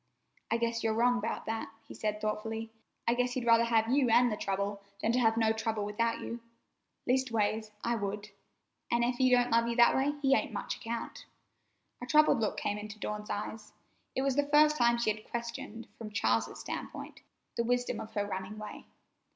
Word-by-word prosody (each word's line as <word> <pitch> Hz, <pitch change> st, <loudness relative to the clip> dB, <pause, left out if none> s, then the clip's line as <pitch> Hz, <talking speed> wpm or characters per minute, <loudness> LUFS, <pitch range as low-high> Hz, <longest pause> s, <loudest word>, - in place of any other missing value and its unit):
"I 230 Hz, -, +2 dB
guess 230 Hz, 0 st, -1 dB
you're 220 Hz, -1 st, +1 dB
wrong 245 Hz, +1 st, +3 dB
'bout -, -, -3 dB
that," 225 Hz, 0 st, -3 dB, 0.2 s
he -, -, -9 dB
said 210 Hz, -1 st, -2 dB
thoughtfully. 220 Hz, +1 st, -3 dB, 0.4 s
"I 235 Hz, -, +4 dB
guess 250 Hz, 0 st, 0 dB
he'd 250 Hz, -1 st, -2 dB
rather 230 Hz, 0 st, +5 dB
have 225 Hz, -1 st, +3 dB
you 265 Hz, -2 st, +3 dB
an' 245 Hz, +2 st, +5 dB
the 215 Hz, -, -1 dB
trouble, 200 Hz, 0 st, -2 dB, 0.2 s
than 225 Hz, -, +1 dB
to 250 Hz, -, +2 dB
have 225 Hz, -2 st, +3 dB
no 220 Hz, -1 st, +3 dB
trouble 220 Hz, -1 st, -2 dB
without 230 Hz, +3 st, -1 dB
you. 235 Hz, -, -5 dB, 0.7 s
Leastways, 225 Hz, -4 st, +1 dB
I 235 Hz, -, +1 dB
would, 205 Hz, -1 st, -3 dB, 0.6 s
an' 235 Hz, 0 st, +2 dB
ef 245 Hz, +1 st, 0 dB
he 260 Hz, -1 st, +5 dB
don't 245 Hz, -1 st, +4 dB
love 230 Hz, 0 st, +4 dB
you 235 Hz, -, -1 dB
that 235 Hz, 0 st, +6 dB
way, 280 Hz, +2 st, +1 dB
he 270 Hz, 0 st, +5 dB
ain't -, -, -1 dB
much -, -, -3 dB
account." 230 Hz, 0 st, -6 dB, 0.7 s
A 245 Hz, -, -5 dB
troubled 305 Hz, 0 st, +5 dB
look 220 Hz, -, -1 dB
came 205 Hz, 0 st, -1 dB
into 210 Hz, 0 st, -8 dB
Dawn's 210 Hz, 0 st, -5 dB
eyes. 210 Hz, +1 st, -5 dB, 0.4 s
It 265 Hz, -, +1 dB
was 275 Hz, -2 st, +1 dB
the 285 Hz, 0 st, +2 dB
first 300 Hz, +1 st, +5 dB
time 235 Hz, -3 st, +3 dB
she 235 Hz, -2 st, +2 dB
had 215 Hz, 0 st, -14 dB
questioned, 235 Hz, 0 st, -5 dB
from 220 Hz, -2 st, -6 dB
Charles's 115 Hz, -, 0 dB
standpoint, -, -, -6 dB, 0.3 s
the 235 Hz, -, +1 dB
wisdom 245 Hz, -1 st, 0 dB
of 220 Hz, 0 st, -8 dB
her 205 Hz, -1 st, +1 dB
running 190 Hz, +1 st, -5 dB
way. 215 Hz, 0 st, -8 dB
230 Hz, 200 wpm, -31 LUFS, 215-245 Hz, 0.7 s, that